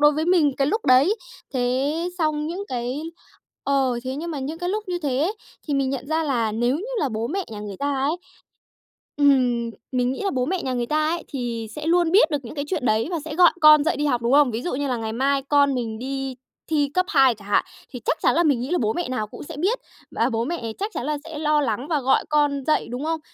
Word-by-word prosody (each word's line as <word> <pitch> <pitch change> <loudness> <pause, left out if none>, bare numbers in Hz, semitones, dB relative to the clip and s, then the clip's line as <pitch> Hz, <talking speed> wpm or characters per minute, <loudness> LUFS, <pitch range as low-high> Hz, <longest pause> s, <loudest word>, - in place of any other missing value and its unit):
đối 295 0 +6
với 310 +2 -1
mình 335 -6 +3
cái 275 - +2
lúc 435 +8 -1
đấy. 275 - +5 0.4
Thế 255 +3 +1 0.3
xong 310 -2 0
những 365 +5 -4
cái 250 +2 -3 0.6
ờ, 270 -3 +1
thế 260 +1 -3
nhưng 335 +3 -4
mà 295 - -4
những 295 +5 -4
cái 355 - -2
lúc 425 +3 -2
như 355 -1 -1
thế 295 +4 0 0.4
thì 290 - +1
mình 270 -1 +1
nhận 275 0 -4
ra 320 +1 0
là 235 -6 0
nếu 240 +5 +1
như 375 - -5
là 285 - +1
bố 225 0 -2
mẹ 380 +6 -2
nhà 210 -2 -7
người 205 -2 -6
ta 285 0 -1
ấy 280 +5 0 1.0
ừm, 250 -5 +3 0.2
mình 250 -1 +1
nghĩ 265 - -5
là 395 - +1
bố 255 -1 0
mẹ 370 +3 -1
nhà 260 -1 -2
người 240 -1 -1
ta 305 +3 +1
ấy 340 0 -2
thì 235 -4 -4
sẽ 300 +1 -6
luôn 345 -1 +3
biết 355 -4 +5
được 295 - +2
những 230 - -8
cái 285 0 -3
chuyện 310 -7 -2
đấy, 220 +2 +2
và 335 - -1
sẽ 310 -1 -5
gọi 355 0 +7
con 305 -1 +8
dậy 320 - +1
đi 295 - 0
học, 245 -4 +1
đúng 235 +3 +1
không? 285 -4 +5
Ví 225 - -3
dụ 350 - -3
như 285 +1 -1
là 250 -3 -1
ngày 220 -1 -4
mai 275 +3 +1
con 285 -2 +4
mình 225 -3 -3
đi 270 0 -4 0.4
thi 290 -3 +2
cấp 365 +1 +2
2 270 - +5
chẳng 205 -1 -14
hạn, 205 - +3 0.3
thì 250 - -7
chắc - - +1
chắn - - +3
là 340 - +4
mình 285 -7 +3
nghĩ 255 - -4
là 355 - +1
bố 220 0 +1
mẹ 350 -6 -3
nào 235 -5 -2
cũng - - -10
sẽ 285 - -9
biết, 395 +11 +1 0.3
và 230 - +1
bố 230 -1 -1
mẹ 245 -8 -4
chắc 415 +2 -2
chắn 245 - -3
là 300 0 -1
sẽ 320 -1 -8
lo 300 -1 +2
lắng 245 +1 -2
và 300 -3 +1
gọi 265 +1 +3
con 290 -2 +2
dậy, 310 - +2
đúng 250 +4 -4
không? 325 0 -1
280 Hz, 265 wpm, -23 LUFS, 250-315 Hz, 1.0 s, con